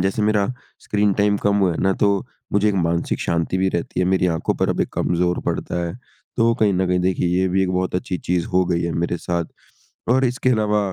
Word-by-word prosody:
जैसे 95 +3 0
मेरा 105 -1 +2 0.3
screen 105 -1 +1
time 100 +1 +2
कम 100 0 +1
हुआ 95 -3 +2
है - - -5
ना 95 - +3
तो, 100 0 +1 0.3
मुझे 105 +1 +3
एक 105 - 0
मानसिक 85 -2 0
शांति 85 +2 -1
भी 95 0 +2
रहती 85 0 -2
है, 90 - +2
मेरी 95 -1 +2
आँखों 80 - -1
पर - - 0
अब - - -1
एक - - 0
कम - - 0
ज़ोर 90 0 +1
पड़ता 85 - -2
है। 85 - -5 0.4
तो 115 0 +3
कहीं 110 -4 +2
न 95 +1 +1
कहीं 90 0 +1
देखिए 90 -1 0
ये 95 - +2
भी 95 +1 +1
एक 90 - 0
बहुत 90 0 -1
अच्छी 90 0 -2
चीज़ 90 -1 -1
हो 90 0 +2
गई 85 -1 0
है 85 - -1
मेरे 85 +1 -1
साथ। 85 0 -2 0.7
और 130 +1 +3
इसके 125 +1 0
अलावा 105 -3 +2
95 Hz, 240 wpm, -21 LUFS, 90-105 Hz, 0.7 s, ना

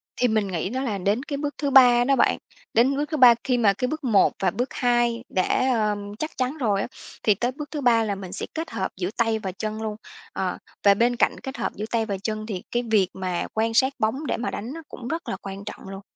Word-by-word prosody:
Thì 250 - +2
mình 215 -3 +1
nghĩ 180 0 -2
đó 260 +4 -2
là 215 -7 -1
đến 205 +7 0
cái 285 -2 -4
bước 290 0 -3
thứ 285 - -1
3 245 -3 +7
đó 275 +2 +3
bạn. - - +3 0.4
Đến 250 +5 +4
bước 295 - 0
thứ 310 - 0
3 245 -3 +8
khi 250 -2 +1
mà 210 -4 +4
cái 250 +6 -2
bước 310 +1 -4
1 220 -6 +4
và 190 - +2
bước 250 +2 -2
2 240 -1 +1
đã, 230 +7 +1
ờ, 215 -2 +1 0.2
chắc 310 - -3
chắn 255 +4 -1
rồi 210 -8 +1
á, - - -2 0.4
thì 210 -2 +4
tới 240 +5 -1
bước 295 +3 -8
thứ 295 -2 -3
3 230 -3 +4
là 205 -2 -1
mình 190 -2 -8
sẽ - - -4
kết 325 +1 -4
hợp 190 - -2
giữa 180 -1 -2
tay 225 -2 +2
và 195 -3 -4
chân 215 +3 -4
luôn. 215 -1 -3 0.4
Ờ, - - -2 0.3
và 200 -1 +7
bên 240 +4 +2
cạnh 240 - +1
kết 265 - -6
hợp - - -2
giữa 210 - -4
tay 225 -1 +1
và 200 -3 -3
chân 215 -1 -3
thì 195 -4 -5
cái 240 0 0
việc 195 -4 +4
mà 185 -2 -3
quan 225 +1 0
sát 265 +3 +3
bóng 255 +8 0
để - - 0
mà 245 - -3
đánh 240 +7 -5
nó 330 - -7
cũng 240 - -8
rất 325 +5 -4
là 190 - -3
quan 195 0 -7
trọng - - -8
luôn. 195 0 -7
230 Hz, 265 wpm, -24 LUFS, 205-260 Hz, 0.4 s, 3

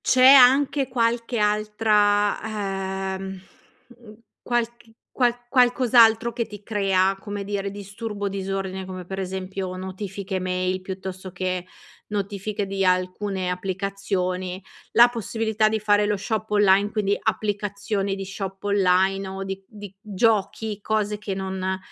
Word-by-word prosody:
c'è 255 0 +3
anche 270 +1 +6
qualche 235 -1 0
altra, 205 -2 +1
ehm, 190 0 -7 0.6
mhmm, 225 -3 -14 0.3
qualc 240 -1 0 0.4
qual 245 -2 +3
qualcos'altro 240 -2 +4
che 235 -1 -2
ti 210 -1 -11
crea, 195 -2 +1
come 205 -1 -5
dire 200 0 -3
disturbo, 205 +1 -5
disordine, 190 -1 -4
come 185 -1 -7
per 190 +2 -6
esempio 190 0 -4
notifiche 190 +1 -5
mail, 185 0 -1
piuttosto 190 0 -7
che 185 0 -3 0.4
notifiche 205 0 -3
di 195 0 -2
alcune 185 +1 0
applicazioni, 185 0 -3 0.3
la 235 +2 +8
possibilità 220 -1 0
di 220 - 0
fare 205 0 +3
lo 210 - +1
shop 215 +2 -3
online 205 0 +4
quindi 205 -2 +1
applicazioni 205 -1 -1
di 195 0 -5
shop 195 0 -6
online 195 -1 +2
o 190 0 -5
di 195 0 -5
di 205 -3 -10
giochi, 215 0 0
cose 210 0 -1
che 205 -2 -4
non 190 0 -3
200 Hz, 125 wpm, -24 LUFS, 190-215 Hz, 0.6 s, la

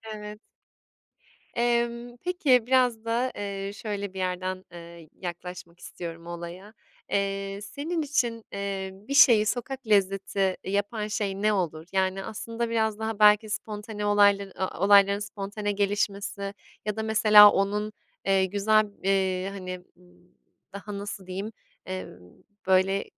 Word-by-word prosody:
Evet. 210 0 -8 1.2
Emm, 235 0 0
peki, 285 -10 +2
biraz 250 -3 +2
da, 235 +3 0
eee, 200 -1 -4
şöyle 200 -3 -5
bir - - -7
yerden, 185 0 -3
ııı, 170 -2 -11
yaklaşmak 175 -1 -8
istiyorum 170 -1 -8
olaya. 175 +5 -8 0.4
Eee, 195 0 -1
senin 300 +10 -3
için, 240 -6 -1
eee, 195 -1 -3
bir 210 +9 -7
şeyi 230 -6 +7
sokak 255 +2 -3
lezzeti 195 -1 +1
yapan 205 +2 -1
şey 200 -1 -2
ne 215 0 +3
olur? 165 -4 -2
Yani, 190 0 0
aslında 230 +1 -4
biraz 220 -2 0
daha 220 -1 -3
belki 210 +1 +5
spontane 210 0 -4
olayları 200 -1 +4
a 185 -2 -3
olayların 200 0 +6
spontane 205 0 -4
gelişmesi 200 0 -2 0.3
ya 210 0 -2
da 220 - -2
mesela 210 -1 +8
onun, 210 +2 -1 0.3
eee, 195 -1 +4
güzel 215 +3 +3 0.2
b 195 - -1
eee, 190 -1 +1
hani, 185 -2 -6 0.2
b 180 - -23 0.7
daha, 200 +1 -7
nasıl 200 -2 -6
diyeyim, 195 +4 -5 0.3
eee, 185 0 -4 0.6
böyle, 190 +1 +3
200 Hz, 130 wpm, -27 LUFS, 190-220 Hz, 1.2 s, mesela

